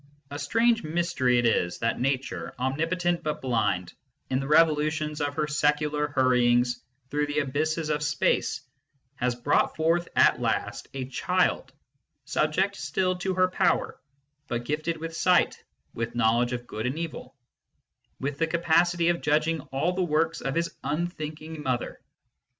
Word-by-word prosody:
A 145 - -5
strange 230 +10 +2
mystery 155 -6 +1
it 120 - +2
is 90 -6 +1
that 115 - -1
Nature, 135 0 -2
omnipotent 165 +7 0
but 150 -1 -3
blind, 105 -8 0 0.4
in 130 - +2
the 135 - -4
revolutions 155 0 +2
of 145 0 -1
her - - 0
secular 150 0 +1
hurryings 125 -3 +2 0.3
through 150 +1 0
the 145 0 -3
abysses 155 +3 0
of 150 -1 0
space, 150 -4 0 0.6
has 125 -1 0
brought 130 +4 +1
forth 165 +2 +1
at - - +4
last - - -2
a 130 -1 -3
child, 130 - 0 0.5
subject 190 +6 0
still 185 +6 0
to 185 +1 -2
her 185 0 +4
power, 185 0 0 0.5
but 120 0 -3
gifted 155 +4 -2
with 165 +1 -6
sight, 180 +1 +2 0.3
with 115 0 -4
knowledge 120 +1 +2
of 120 0 -4
good 110 0 -4
and 130 +5 -3
evil, 160 -5 -6 0.8
with 140 +1 -3
the 165 - +2
capacity 170 +1 +2
of 170 0 0
judging 155 +1 +1
all 145 +7 0
the 185 - -1
works 165 -1 0
of 135 - -2
his 170 0 -1
unthinking 155 -1 -4
Mother. 130 -4 -3
150 Hz, 150 wpm, -27 LUFS, 130-165 Hz, 0.8 s, at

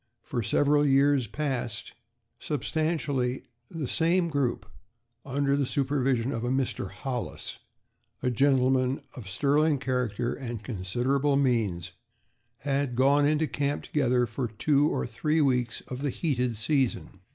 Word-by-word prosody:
For 120 - -2
several 145 +6 +3
years 140 -2 +3
past, 120 -2 -3 0.5
substantially 145 -4 -1 0.3
the 160 -6 -4
same 170 +4 +2
group 135 -8 -1 0.6
under 140 +1 0
the 140 - +1
supervision 135 -3 0
of 115 -3 -3
a 120 - -1
Mr. 130 -7 -1
Hollis, 120 +5 -5 0.6
a 125 - +2
gentleman 130 +1 +2
of 110 -7 -9
sterling 145 +8 +2
character 125 -3 -1
and 120 -5 -6
considerable 125 +7 0
means, 105 -10 0 0.7
had 140 -2 -1
gone 140 +3 +4
into 155 +1 +2
camp 145 -1 -2
together 125 -4 +1
for 120 +2 -3
two 140 +7 +2
or - - -1
three 150 +7 0
weeks 125 -5 +1
of 125 +1 -7
the 145 - 0
heated 125 -6 -1
season. 130 +2 -1
135 Hz, 130 wpm, -28 LUFS, 120-145 Hz, 0.7 s, gone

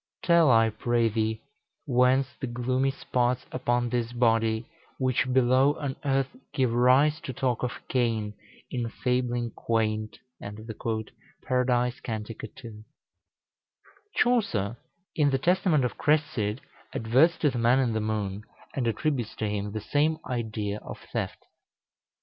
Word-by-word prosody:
Tell, 170 -4 +5
I 115 -2 +5
pray 115 +1 +1
thee, 110 +1 -1 0.4
whence 130 0 +3
the 135 - -3
gloomy 125 +3 0
spots 125 -2 -1
Upon 120 -1 0
this 120 -1 -1
body, 115 -1 +2 0.3
which 130 0 +1
below 130 +3 +4
on 140 -2 -4
earth 135 - 0 0.2
Give 130 -4 +2
rise 130 +6 +4
to 130 - -5
talk 125 -1 -1
of 125 - -4
Cain 115 -4 0 0.4
in 120 -2 -2
fabling 120 -1 -1
quaint?" 110 -1 -1 1.3
Paradise, 125 -1 +1
cant. 110 -1 -5
ii. 110 0 -10 1.3
Chaucer, 120 - +1 0.4
in 150 -2 +3
the 135 - +2
"Testament 170 -2 +2
of 125 - -4
Cresside," 135 -7 +1 0.3
adverts 130 +10 +3
to 150 - +2
the 120 - -3
man 120 +2 +4
in 125 -4 +1
the 110 - 0
moon, 105 -2 -2 0.3
and 125 -4 -1
attributes 120 0 -1
to 110 - -2
him 105 0 -2
the 110 +1 -4
same 150 +7 +1
idea 110 -4 -3
of - - -8 0.2
theft. - - -3
120 Hz, 130 wpm, -27 LUFS, 110-135 Hz, 1.3 s, Tell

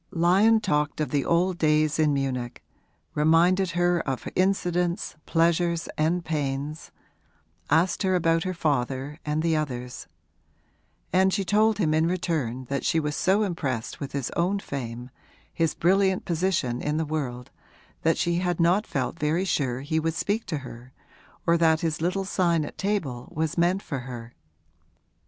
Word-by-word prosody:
Lyon 195 +7 +4
talked 150 -8 0
of 155 - -1
the 145 -2 +1
old 175 +1 +1
days 155 0 +2
in 155 -1 +4
Munich, 130 -3 -2 0.5
reminded 170 +5 +3
her 175 0 +3
of 135 -5 -3
incidents, 180 -2 0
pleasures 170 0 +1
and 170 +3 0
pains, 145 0 -3 0.8
asked 170 +1 +2
her 185 -1 +2
about 165 -1 +2
her 185 0 -3
father 140 -1 -1
and 150 +1 -1
the 165 -1 +2
others; 125 - -4 1.1
and 190 +1 +4
she 195 0 -1
told 215 +2 +3
him 160 -7 +1
in 160 +1 +3
return 155 -9 -2
that 140 +2 -3
she 165 - +2
was 150 -1 -2
so 195 +3 +2
impressed 140 - -3
with 140 -2 -6
his 140 -3 -2
own 180 +4 0
fame, 125 -7 -6 0.4
his 165 -1 0
brilliant 190 +2 +2
position 165 -8 0
in 150 +1 -1
the 160 - 0
world, 130 -5 -4 0.5
that 165 0 +2
she 170 0 +1
had 180 -1 -1
not 180 +5 +3
felt 135 +4 -3
very 160 +5 +1
sure 130 -8 -1
he 155 +3 -1
would 165 0 -1
speak 205 +6 -1
to 165 -3 -2
her 125 +1 -11 0.5
or 170 0 +3
that 160 -1 +3
his 160 -2 -1
little 185 +3 0
sign 170 -5 +1
at - - -9
table 170 -12 -2
was 160 +1 -1
meant 180 +3 +1
for 140 - -4
her. 120 -2 -8
160 Hz, 160 wpm, -26 LUFS, 140-180 Hz, 1.1 s, Lyon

